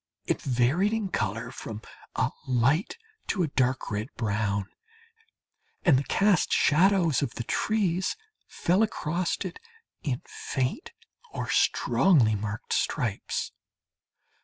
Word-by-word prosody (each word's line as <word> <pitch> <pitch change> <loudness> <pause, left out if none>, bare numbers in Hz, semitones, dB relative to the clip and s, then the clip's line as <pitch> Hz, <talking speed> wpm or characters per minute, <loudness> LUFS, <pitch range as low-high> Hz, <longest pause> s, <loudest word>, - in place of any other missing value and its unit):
It - - -1
varied 140 - +2
in 220 -3 -1
colour 115 - -2
from 110 -1 -7 0.3
a - - +1 0.2
light 130 - +2 0.3
to 185 - +1
a - - +1
dark 130 -3 0
red 105 +2 -2
brown, 105 -3 -1 1.2
and 165 -7 +6
the 135 - +2
cast 200 -3 +2
shadows 170 -1 +4
of 140 -5 -2
the 120 - -3
trees 190 - 0 0.3
fell 180 +5 +1
across 175 -5 0
it 450 - -6 0.4
in 135 -8 -2
faint 130 - -3 0.4
or - - -3
strongly 140 - +3
marked 105 +1 -3
stripes. - - -1
140 Hz, 115 wpm, -27 LUFS, 115-185 Hz, 1.2 s, and